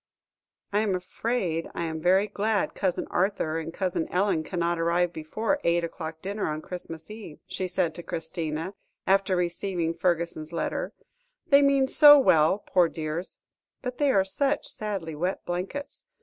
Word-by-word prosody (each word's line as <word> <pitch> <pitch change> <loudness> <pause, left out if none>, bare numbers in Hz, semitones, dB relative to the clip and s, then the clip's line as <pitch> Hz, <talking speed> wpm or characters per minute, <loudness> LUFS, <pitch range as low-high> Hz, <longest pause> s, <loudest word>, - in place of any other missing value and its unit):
"I 205 - +3
am 210 -3 +1
afraid 180 -2 -2
I - - -2
am 160 -1 -4
very 190 +4 +4
glad 210 +1 0
Cousin 185 -3 -1
Arthur 175 -4 0
and 165 0 -5
Cousin 180 -2 -2
Ellen 180 -3 +1
cannot 170 0 -1
arrive 170 +1 +1
before 215 - -2
eight 170 0 +2
o'clock 160 -1 -6
dinner 200 +2 -2
on 155 0 -2
Christmas 165 0 -8
Eve," 215 -8 -9
she 185 - -4
said 180 -2 0
to 175 - -7
Christina, 160 +1 -2 0.3
after 195 0 +3
receiving 175 -1 -1
Fergusson's 170 -3 -1
letter; 170 - -2 0.5
"they 280 0 +6
mean 275 -1 +4
so 295 +1 +9
well, 160 - +4
poor 180 -3 +3
dears, 160 +3 -5 0.5
but 250 -1 -5
they 290 -2 +3
are 195 -5 +3
such 280 +9 0
sadly 200 -8 -4
wet 180 +5 -2
blankets. 185 +11 -5
180 Hz, 155 wpm, -27 LUFS, 165-205 Hz, 0.5 s, so